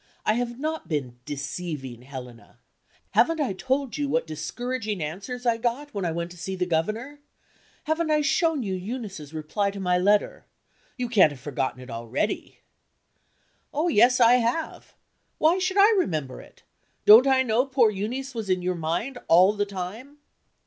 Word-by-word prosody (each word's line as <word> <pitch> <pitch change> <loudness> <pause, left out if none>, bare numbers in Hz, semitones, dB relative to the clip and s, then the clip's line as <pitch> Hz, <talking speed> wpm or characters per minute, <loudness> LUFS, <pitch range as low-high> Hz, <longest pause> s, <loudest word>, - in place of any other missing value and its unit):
I 215 - +3
have 240 +1 -2
not 315 +2 -3
been 130 -6 -3
deceiving 145 -3 -5
Helena. 125 -3 -11 0.5
Haven't 330 -1 +3
I 270 -10 0
told 265 +7 -2
you 285 -1 -1
what 245 -6 +1
discouraging 215 +6 -4
answers 200 +11 -5
I 235 -1 +2
got, 245 +5 -2
when 200 -3 -2
I 170 - 0
went 170 +1 -4
to 180 - -12
see 190 +2 -4
the 180 -1 -1
Governor? 215 - -2 0.6
Haven't 315 +1 -1
I 305 -1 +3
shown 315 -1 +1
you 195 -3 -3
Eunice's 190 - -6
reply 160 +6 -2
to 200 0 -7
my 180 -1 +1
letter? 205 +3 +1 0.5
You 250 -1 -2
can't 205 -10 +5
have 140 - -10
forgotten 130 -1 -3
it 125 - -10
already?" 115 - -3 1.1
"Oh, 310 +4 0
yes, 250 -2 +5
I 240 +1 +6
have. 250 +7 -3 0.4
Why 330 +4 +3
should 375 +1 -1
I 410 +3 +7
remember 155 - -1
it? - - -19 0.4
Don't 225 +6 +9
I 265 -1 +4
know 245 +2 +1
poor 255 -5 +3
Euneece 245 +7 -4
was 220 -4 -5
in 185 -1 +1
your 180 0 0
mind, 175 +11 -3
all 185 +5 +6
the 205 -1 -1
time?" 200 +9 -7
210 Hz, 170 wpm, -25 LUFS, 170-260 Hz, 1.1 s, Don't